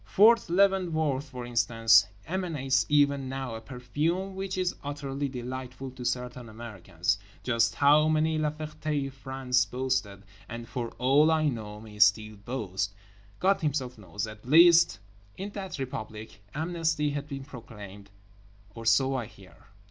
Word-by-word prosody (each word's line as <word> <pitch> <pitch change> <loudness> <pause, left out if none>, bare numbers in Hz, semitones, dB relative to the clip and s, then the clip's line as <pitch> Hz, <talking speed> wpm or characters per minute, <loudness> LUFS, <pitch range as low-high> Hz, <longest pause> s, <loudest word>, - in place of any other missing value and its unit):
Fort 215 - +5
Leavenworth, 170 -7 +2
for 125 -2 -7
instance, 115 -3 +4 0.2
emanates 145 -9 0
even 140 -2 +3
now 130 -2 -4
a 110 - -6
perfume 150 +10 -2
which 190 0 -4
is 185 -1 0
utterly 140 -1 -3
delightful 130 +1 -6
to 125 -1 -9
certain 125 -1 -3
Americans. 100 -5 -3 0.2
Just 115 -2 +1
how 150 +2 +5
many 155 0 +2
La 155 -1 +1
Fertés 150 -2 -4
France 130 -2 0
boasted 120 -4 -2 0.3
(and 115 0 -7
for 120 -2 -4
all 140 +5 +4
I 155 -2 +3
know 105 -4 -6
may 105 -1 -12
still 110 +1 +4
boast) 100 -3 -4 0.4
God 195 +1 +2
Himself 135 -5 -1
knows. 105 +2 -4
At 110 0 -10
least, 170 0 +6 0.4
in 200 +2 -5
that 195 -4 -6
Republic, 110 -6 -7
amnesty 160 -2 0
has 145 0 -3
been 140 -2 -6
proclaimed, 105 -7 -11 0.6
or 115 0 -7
so 135 +4 +4
I 120 -4 -3
hear. 100 -4 -17
130 Hz, 140 wpm, -28 LUFS, 115-155 Hz, 0.6 s, least